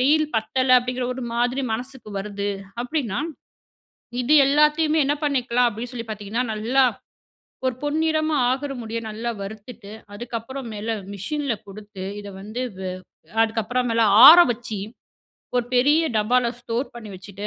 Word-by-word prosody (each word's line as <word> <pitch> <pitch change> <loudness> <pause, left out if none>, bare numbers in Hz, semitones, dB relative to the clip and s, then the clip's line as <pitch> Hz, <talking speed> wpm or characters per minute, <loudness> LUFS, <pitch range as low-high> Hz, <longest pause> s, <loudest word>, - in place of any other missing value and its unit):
வெயில் 305 +4 +4
பத்தல, 255 +4 0
அப்டிங்குற 250 0 -3
ஒரு 255 -1 -5
மாதிரி 245 +3 0
மனசுக்கு 245 -1 -6
வருது 205 0 -3 0.3
அப்டின்னா, 255 -4 -2 1.0
இது 275 +5 +3
எல்லாத்தயுமே 300 +2 +3
என்ன 290 +2 +1
பண்ணிக்கலாம்? 250 -3 +2
அப்டி 235 +3 -6
சொல்லிப் 230 -2 -6
பாத்தீங்கன்னா, 215 +4 -3
நல்லா 235 +6 +2 0.8
ஒரு 255 - 0
பொன் 295 +1 -1
நிறமா 310 -1 +1
ஆகிற 275 +2 -2
முடிய 225 0 -4
நல்லா 230 +3 -3
வறுத்துட்டு, 205 +1 -9 0.2
அதுக்கப்புறம் 235 +4 -6
மேல 210 +2 -6 0.2
மெஷின்ல 275 +6 -2
குடுத்து, 205 -1 -9 0.2
இத 205 - -9
வந்து 220 +5 -5 0.2
வ - - -7 0.6
அதுக்கப்புறம் 225 +2 0
மேல 230 0 +2 0.2
ஆற 335 +3 +11
வச்சு, 230 -3 -4 0.8
ஒரு 245 - +2
பெரிய 290 +6 +4
டப்பால 235 +3 +2
ஸ்டோர் 240 +3 -2
பண்ணி 235 -3 -9
வச்சிட்டு, 200 +2 -8
245 Hz, 135 wpm, -23 LUFS, 215-270 Hz, 1.0 s, ஆற